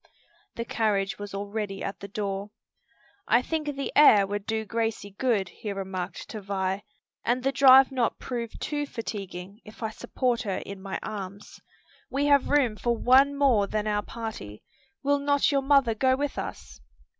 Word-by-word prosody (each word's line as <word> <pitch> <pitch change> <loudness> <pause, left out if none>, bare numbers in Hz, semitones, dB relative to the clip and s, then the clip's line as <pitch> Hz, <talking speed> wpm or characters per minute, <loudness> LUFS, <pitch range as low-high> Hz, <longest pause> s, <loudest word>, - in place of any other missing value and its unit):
The 235 - -4
carriage 205 -5 0
was 205 -1 -6
already 200 0 -4
at 195 - -5
the 200 - -7
door. 200 0 -3 0.8
"I 235 +2 +4
think 315 0 -2
the 275 - -4
air 215 -9 +7
would 205 0 -4
do 220 0 -1
Gracie 225 -2 -2
good," 200 -3 0
he 210 - -6
remarked 190 -2 -5
to 215 - -6
Vi, 195 0 -2 0.4
"and 250 +2 0
the 270 - +2
drive 270 0 +7
not 250 -3 0
prove 235 -3 -5
too 290 -1 -3
fatiguing 200 -4 -7
if 215 +1 -12
I 220 - -1
support 245 +1 -1
her 200 -5 -2
in 200 -1 -8
my 195 0 -4
arms. 200 -1 -7 0.5
We 280 +1 0
have 285 -2 +4
room 260 -7 +2
for 235 +1 0
one 270 +4 +5
more 245 -8 +3
than 215 0 -2
our 210 -1 0
party. 210 - -7 0.4
Will 285 0 +2
not 285 +1 +2
your 280 -1 +2
mother 270 -4 +4
go 260 +4 +2
with 285 +1 -3
us?" - - -7
220 Hz, 170 wpm, -27 LUFS, 200-260 Hz, 0.8 s, air